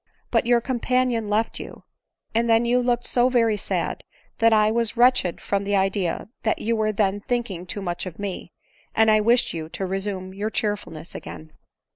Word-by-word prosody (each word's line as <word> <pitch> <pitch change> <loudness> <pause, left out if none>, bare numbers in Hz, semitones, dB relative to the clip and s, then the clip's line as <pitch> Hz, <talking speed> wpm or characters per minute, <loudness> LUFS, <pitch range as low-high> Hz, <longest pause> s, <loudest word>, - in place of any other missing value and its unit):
But - - +2
your 240 -1 +4
companion 250 -3 0
left 220 +2 0
you; - - -9 0.5
and 230 +1 +1
then 225 +1 +4
you 245 +1 +3
looked 245 -1 0
so 245 0 +3
very 230 -4 +3
sad, 205 - -2 0.4
that 230 -1 +5
I 215 -1 +4
was 230 0 0
wretched 245 -7 +3
from 200 0 -1
the 200 0 0
idea 195 -2 0
that 220 - 0
you 230 +1 -1
were 215 -1 +1
then 205 -1 0
thinking 210 -7 -3
too 205 +2 -5
much 175 0 -3
of 170 - -8
me, 200 -3 -5 0.4
and 220 0 +5
I 215 - +5
wished 235 +3 +3
you 160 -1 -5
to 190 - -4
resume 190 0 -3
your 205 +3 -2
cheerfulness 205 -7 -3
again. 155 0 -9
215 Hz, 185 wpm, -24 LUFS, 195-235 Hz, 0.5 s, that